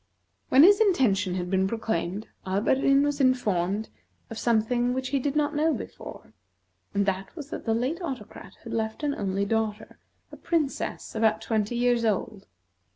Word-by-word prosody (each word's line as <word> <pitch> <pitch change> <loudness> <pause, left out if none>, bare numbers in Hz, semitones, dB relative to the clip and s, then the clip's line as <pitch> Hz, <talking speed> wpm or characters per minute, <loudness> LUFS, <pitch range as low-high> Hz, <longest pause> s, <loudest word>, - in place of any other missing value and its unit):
When 270 +3 +7
his 400 +3 +7
intention 205 - +2
had 180 0 -3
been 190 0 +2
proclaimed, 205 -2 -3 0.2
Alberdin 265 +8 +2
was 290 0 0
informed 210 -6 +1 0.4
of 225 - -5
something 240 +2 +1
which 260 0 -2
he 275 0 +1
did 280 +2 -2
not 300 0 +1
know 315 +2 +2
before, - - -9 0.6
and 200 0 +2
that 195 - -3
was 300 -3 -9
that - - -6
the 225 -1 +1
late 265 +10 -1
Autocrat 230 - -7
had 230 - -7
left 220 +4 -3
an 290 -1 +1
only 200 -3 -1
daughter, 220 0 -2 0.3
a - - -10
Princess 315 -5 -2
about 220 -1 +2
twenty 220 0 -1
years 240 -1 +2
old. 215 -1 -2
225 Hz, 160 wpm, -26 LUFS, 205-275 Hz, 0.6 s, When